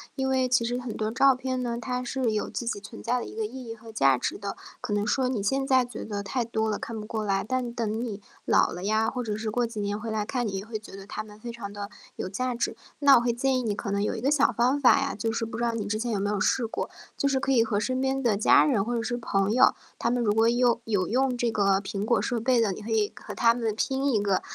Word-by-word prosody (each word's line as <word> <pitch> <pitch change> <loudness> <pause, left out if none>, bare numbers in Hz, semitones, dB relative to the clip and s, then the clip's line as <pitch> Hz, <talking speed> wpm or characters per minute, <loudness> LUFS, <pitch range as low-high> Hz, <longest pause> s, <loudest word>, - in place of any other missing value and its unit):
因 265 -1 -1
为 260 -1 +2
其 245 -2 +3
实 245 +1 -1
很 245 -3 -5
多 215 0 -1
照 270 +2 +5
片 255 0 -2
呢， 235 -1 -2
它 250 +2 -3
是 245 -2 -1
有 215 - -1
自 240 - -4
己 230 - -2
存 215 +3 -11
在 245 +1 +1
的 - - -5
一 - - -9
个 220 - -1
意 255 +4 -7
义 225 - -5
和 225 0 -12
价 135 - +4
值 125 - -3
的， 200 -1 -5 0.2
可 250 - -5
能 205 0 +1
说 260 +1 +1
你 230 -6 -1
现 270 +6 0
在 260 -2 +4
觉 240 -2 -7
得 205 -2 -4
太 240 +5 -1
多 220 -1 -1
了， - - -2
看 225 -2 -5
不 210 - -6
过 220 0 -3
来， 195 -2 0
但 255 -1 -1
等 225 -1 -2
你 210 -4 -5 0.2
老 - - +3
了 180 +1 -6
呀， 220 +1 +2
或 250 - -3
者 210 -2 -2
是 220 -1 -3
过 240 +1 +1
几 225 -2 -7
年 205 +1 -2
回 225 - -5
来 215 -1 -1
看， 245 +1 -1
你 195 - -4
也 195 +2 -4
会 220 -1 -5
觉 210 - -12
得 195 0 -9
它 205 - -5
们 210 -1 -14
非 235 +2 -6
常 215 -4 -7
地 205 +1 -6 0.2
有 - - -4
价 250 +6 -2
值。 235 - -1 0.2
那 280 -3 +7
我 - - +3
会 240 0 +1
建 260 +2 +1
议 - - -1
你 215 -4 -1
可 200 - -4
能 200 0 0
有 210 - 0
一 - - -4
个 270 +5 +1
小 285 -3 +4
方 255 +5 +1
法 255 - +6
呀， 275 0 -1
就 225 +2 -2
是 225 0 -1
不 225 0 -6
知 - - -1
道 235 -1 +1
你 220 -3 -2
之 215 +1 -2
前 235 +1 -2
有 205 - 0
没 200 - 0
有 205 -1 0
试 235 +4 +2
过。 - - -4 0.3
就 280 - +1
是 275 -1 +2
可 270 +1 0
以 235 -4 +4
和 220 -2 0
身 255 +1 -1
边 265 0 0
的 220 -4 +2
家 210 - +6
人 225 -9 +2
或 240 +1 -1
者 230 - -1
是 240 +1 -2
朋 200 -4 0
友， 255 +3 +5 0.3
他 235 - +1
们 245 0 +1
如 205 - +2
果 225 +2 +4
用 240 0 +3
有 205 -5 +1
用 255 +4 +1
这 240 -1 +1
个 200 -2 +2
苹 200 +1 -3
果 235 0 +2
设 240 -3 -1
备 245 +1 +3
的， 215 -3 +2
你 200 - -6
可 215 - -8
以 215 -2 +2
和 - - -9
他 230 -1 +4
们 230 -3 -2
拼 270 +3 0
一 205 -2 +2
个 195 -2 +1
230 Hz, 330 characters per minute, -27 LUFS, 210-250 Hz, 0.3 s, 那